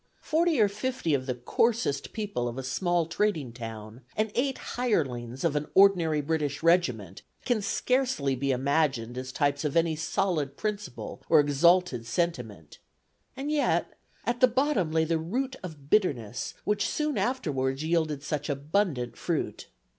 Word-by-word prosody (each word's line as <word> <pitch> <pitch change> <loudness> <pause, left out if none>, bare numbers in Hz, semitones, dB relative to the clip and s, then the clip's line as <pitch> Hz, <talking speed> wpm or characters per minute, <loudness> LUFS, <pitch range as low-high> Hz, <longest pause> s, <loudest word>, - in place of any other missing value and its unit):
Forty 325 -2 +2
or 210 - +6
fifty 215 - -2
of 130 -1 0
the 125 - -1
coarsest 145 - 0
people 205 - -3
of 120 +1 -5
a 135 - -4
small 175 +6 0
trading 165 - -1
town 115 0 -8 0.2
and 215 0 +1
eight 265 +2 0 0.2
hirelings 130 - -1
of 165 -3 +1
an 150 0 -1
ordinary 175 -6 +5
British 145 -1 -2
regiment 125 - +2 0.2
can 240 -4 +1
scarcely 250 - 0
be 140 +2 -2
imagined 135 -3 +1
as 130 0 -5
types 145 +1 0
of 150 +1 0
any 165 -1 +2
solid 155 -3 -1
principle 210 -1 -4
or 160 - +7
exalted 145 -3 +3
sentiment, 120 - -3 0.6
and 280 +3 -3
yet 295 -2 +1 0.3
at 240 0 -1
the 255 - +7
bottom 250 - +1
lay 160 0 +3
the 165 0 0
root 255 +11 -2
of 150 -6 -10
bitterness 125 - 0
which 210 -1 0
soon 300 -2 -1
afterwards 145 - -1
yielded 160 -3 0
such 150 0 -3
abundant 145 -2 -1
fruit. - - -3
160 Hz, 150 wpm, -28 LUFS, 135-210 Hz, 0.6 s, or